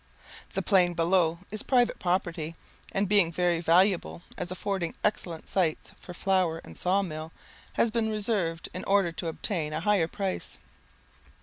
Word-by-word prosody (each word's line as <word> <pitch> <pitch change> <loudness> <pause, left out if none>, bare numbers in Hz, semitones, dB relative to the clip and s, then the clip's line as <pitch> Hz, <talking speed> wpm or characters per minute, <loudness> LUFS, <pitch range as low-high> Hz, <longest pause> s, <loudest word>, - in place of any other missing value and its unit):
The - - -1
plain 180 -4 +3
below 165 0 +2
is 215 0 -4
private 245 -3 +2
property, 170 -3 -1 0.4
and 195 +1 0
being 195 -4 +4
very 175 0 +1
valuable, 175 +1 +2
as 180 - -4
affording 185 -1 -2
excellent 175 -6 -1
sites 175 -5 0
for 180 - -10
flour 185 -3 +1
and - - -12
saw 190 +2 +1
mills, 155 -2 -6 0.4
has 235 - +2
been 225 -1 0
reserved 205 -6 -1
in 185 - -5
order 195 -3 +3
to 165 - -5
obtain 160 -1 -1
a 155 - -1
higher 195 -3 +3
price. 190 +2 -4
180 Hz, 150 wpm, -28 LUFS, 165-200 Hz, 0.4 s, being